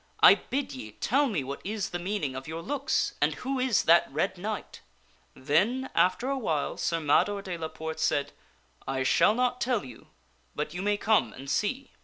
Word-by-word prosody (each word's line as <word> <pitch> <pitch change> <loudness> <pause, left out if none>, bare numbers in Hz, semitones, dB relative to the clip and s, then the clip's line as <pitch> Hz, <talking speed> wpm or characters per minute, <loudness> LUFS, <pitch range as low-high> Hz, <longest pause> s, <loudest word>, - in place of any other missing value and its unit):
I - - +10
bid 270 - -3
ye 110 -5 -8
tell 280 - +1
me 195 - -1
what 140 +2 -6
is 210 -1 -3
the 175 - -3
meaning 175 -7 -2
of 135 +1 -7
your 165 +1 -5
looks, 285 - 0
and - - +2
who 265 +1 -3
is 255 -4 +2
that 170 -3 +5
red 155 +7 0
knight! 205 +4 -5 0.3
" - - -33 0.2
Then 205 - +1
after 185 +8 +2
a 275 0 -1
while 160 - -1
Sir 165 - 0
Mador 195 +7 +2
de 185 -2 -4
la 165 -1 -4
Porte 160 0 -6
said, 145 -2 +1 0.3
" 60 -1 -31
I 130 - 0
shall 210 +10 +4
not 250 0 0
tell 240 - 0
you, 125 -3 -12 0.5
but 150 +1 -3
you 180 - -4
may 205 +1 +1
come 215 +1 +2
and 135 +1 -10
see." 250 - -1
185 Hz, 205 wpm, -28 LUFS, 150-245 Hz, 0.5 s, I